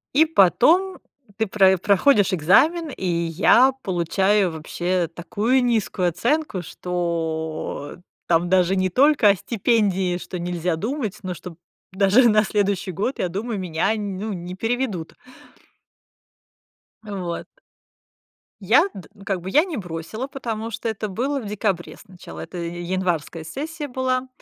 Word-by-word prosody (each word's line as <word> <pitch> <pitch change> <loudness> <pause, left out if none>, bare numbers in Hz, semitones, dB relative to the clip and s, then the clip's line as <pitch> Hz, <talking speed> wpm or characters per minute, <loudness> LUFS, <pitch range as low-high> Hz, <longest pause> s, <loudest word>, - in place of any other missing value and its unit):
И 315 - +6
потом 330 - +3 0.4
ты 220 - 0
прои 190 -1 +4
проходишь 200 +1 +3
экзамен, 300 - +3
и 215 -8 -6
я 175 +9 +4
получаю 190 +2 +1
вообще 175 +3 -2
такую 225 +9 0
низкую 215 -6 +1
оценку, 235 - -1
что 160 -4 -4 0.3
там 170 +1 +2
даже 185 0 +3
не 185 0 +1
только 270 - +4
о 200 - +5
стипендии, 195 -4 0
что 180 0 -7
нельзя 175 0 -2
думать, 215 - -3
но 185 -1 -3
что 180 +2 -9
п 165 - -17 0.4
даже 205 +6 +5
на 215 0 +4
следующий 200 -2 0
год, 210 +10 -2
я 180 - +1
думаю, 205 +4 -4
меня, 170 +1 0
ну, 205 +1 -4
не 180 0 -6
переведут. 225 -6 -2 1.9
Вот. 185 -5 -5 1.2
Я - - +5
д 185 -5 -11 0.2
как 195 -3 -2
бы 185 - -6
я 305 - +4
не 345 - -5
бросила, 180 +7 -5
потому 230 -5 -5
что 225 +2 -4
это 220 -1 -3
было 270 +8 -2
в 215 - -7
декабре 200 -4 -2
сначала, 185 -4 -11
это 180 - -7
и 170 +1 -5
январская 175 -3 -2
сессия 295 - -5
была. 255 0 -1
195 Hz, 140 wpm, -22 LUFS, 175-235 Hz, 1.9 s, И